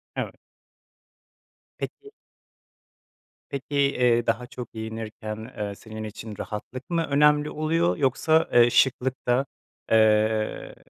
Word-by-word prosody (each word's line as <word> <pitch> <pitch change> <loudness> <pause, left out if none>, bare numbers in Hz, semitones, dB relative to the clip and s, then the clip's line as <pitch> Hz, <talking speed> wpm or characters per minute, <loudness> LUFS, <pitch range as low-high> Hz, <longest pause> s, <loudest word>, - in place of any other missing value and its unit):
Evet. - - -3 1.4
Peki. 415 0 -7 1.4
Peki, 140 +1 -5
eee, 125 -4 +3
daha 120 +2 0
çok 120 -1 -8
giyinirken, 110 +1 -6
eee, 105 -1 -3
senin 110 +1 -8
için 105 0 -8
rahatlık 125 +5 -7
mı 165 -1 +1
önemli 150 +1 +4
oluyor 165 +3 +1
yoksa, 155 +3 +2
eee, 120 0 +7
şıklık 130 +1 +1
da, 125 +3 +3 0.5
eee, 110 0 +2
120 Hz, 105 wpm, -25 LUFS, 110-140 Hz, 1.4 s, eee